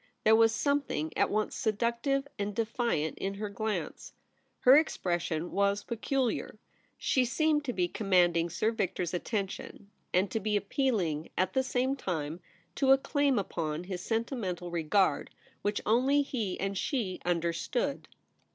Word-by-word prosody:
There 220 +1 +6
was 225 0 +5
something 275 - -1
at - - +2
once 215 +1 0
seductive 235 +6 0
and 205 0 -2
defiant 225 -8 -1
in 195 +1 -2
her 210 +1 -4
glance. 215 +1 -4 0.5
Her 255 +2 +8
ex 310 +2 +3
pression 175 -2 -1
was 200 +1 +1
peculiar. 250 +2 -1 0.4
She 260 - +2
seemed 300 +4 +1
to 255 - -1
be 180 -4 +1
commanding 175 -4 +2
Sir 215 +6 0
Victor's 185 -6 -2
attention, 200 +1 -4 0.2
and 185 +2 +2
to 225 - 0
be 210 0 -1
appealing, 200 - 0
at 185 - +1
the 265 - +3
same 260 +1 0
time, 165 - -3 0.4
to 270 -1 +4
a 270 - +8
claim 280 -1 +1
upon 165 -4 -2
his 180 -1 -5
sentimental 210 - -2
regard, 175 +3 +1 0.3
which 205 0 -1
only 265 +6 +3
he 225 -9 -3
and 195 0 -2
she 225 -11 -2
understood. 175 - -1
210 Hz, 145 wpm, -30 LUFS, 180-250 Hz, 0.5 s, Her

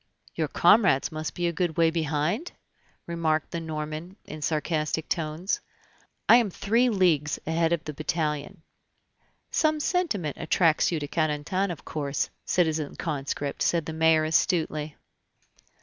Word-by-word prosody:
"Your - - -1
comrades 185 - +4
must 155 0 -5
be 175 - -1
a 170 - 0
good 170 -2 -1
way 165 -1 +4
behind?" 160 - -1 0.5
remarked 160 -2 -1
the 170 - -3
Norman 155 +2 -5
in 155 0 -8
sarcastic 155 0 -1
tones. 165 +3 -2 0.7
"I 235 - +9
am 235 -4 +2
three 230 +7 +2
leagues 170 -8 +2
ahead 165 +1 +1
of 170 -2 0
the 150 - -6
battalion." 150 -1 -3 0.9
"Some 310 -1 +2
sentiment 285 - -1
attracts 165 0 +2
you 165 - 0
to 145 - -4
Carentan, 155 +5 0
of 175 - -7
course, 140 -2 -2
citizen 160 -4 0
conscript," 140 -2 -3
said 170 -3 +2
the 160 - -5
mayor 160 0 +4
astutely. 155 -2 0
160 Hz, 135 wpm, -26 LUFS, 155-175 Hz, 0.9 s, I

